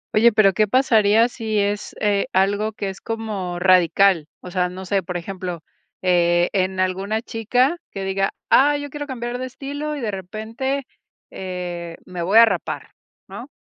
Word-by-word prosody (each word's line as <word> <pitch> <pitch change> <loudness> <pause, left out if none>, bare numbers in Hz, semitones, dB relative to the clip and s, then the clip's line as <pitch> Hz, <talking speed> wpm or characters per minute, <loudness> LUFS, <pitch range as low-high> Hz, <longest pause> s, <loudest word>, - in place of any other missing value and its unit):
Oye, 235 +2 +6
pero 200 -3 +4
¿qué 215 -1 +2
pasaría 225 -2 +4
si 220 -3 -3
es, 205 0 -1
eh, 205 -1 +1
algo 200 +3 +1
que 200 -2 -4
es 190 - -9
como 210 -6 -4
radical? 185 -2 +4
O 180 - -9
sea, 180 -1 0
no 185 +1 -8
sé, 195 +1 +1
por 175 +1 -4
ejemplo, 180 -2 -6 0.4
eh, 175 -1 +3
en 190 -1 0
alguna 195 +4 -1
chica 250 +8 +1
que 195 - -6
diga: 195 0 0 0.2
"Ah, 290 +2 +5
yo 285 -1 -6
quiero 295 -1 -5
cambiar 245 -1 -4
de 255 - -3
estilo, 285 +3 -5
y 280 - -6
de 215 -3 -2
repente, 225 +8 -4 0.5
eh, 175 -2 -6
me 180 -1 -6
voy 195 +6 +3
a 230 - +10
rapar", 195 -6 -3 0.4
¿no? - - -9
200 Hz, 170 wpm, -21 LUFS, 185-230 Hz, 0.5 s, a